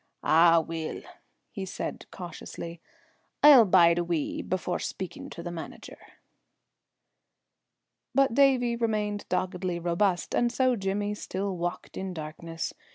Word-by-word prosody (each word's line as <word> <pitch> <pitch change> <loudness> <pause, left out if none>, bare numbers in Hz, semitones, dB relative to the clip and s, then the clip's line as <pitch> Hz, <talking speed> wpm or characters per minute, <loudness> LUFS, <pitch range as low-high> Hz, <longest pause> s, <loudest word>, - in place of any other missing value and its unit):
"Ah, 165 +1 +6
weel," 160 0 -5 0.5
he 200 - -5
said 190 - -5
cautiously, 170 -1 -8 0.6
"I'll 280 -6 +9
bide 175 -3 +5
a - - +1
wee 170 -3 -2
before 185 -1 -2
speaking 180 -2 -6
to 170 - -8
the 175 - -5
manager." 165 -2 -9 2.2
But 275 -3 +4
Davie 255 -3 +4
remained 210 -3 -2
doggedly 180 -1 -1
robust, 175 +1 0
and 240 0 +2
so 255 +1 +2
Jimmy 205 0 -2
still 195 -1 -4
walked 175 0 -4
in 190 -1 -4
darkness. 165 +1 -5
185 Hz, 120 wpm, -28 LUFS, 170-210 Hz, 2.2 s, I'll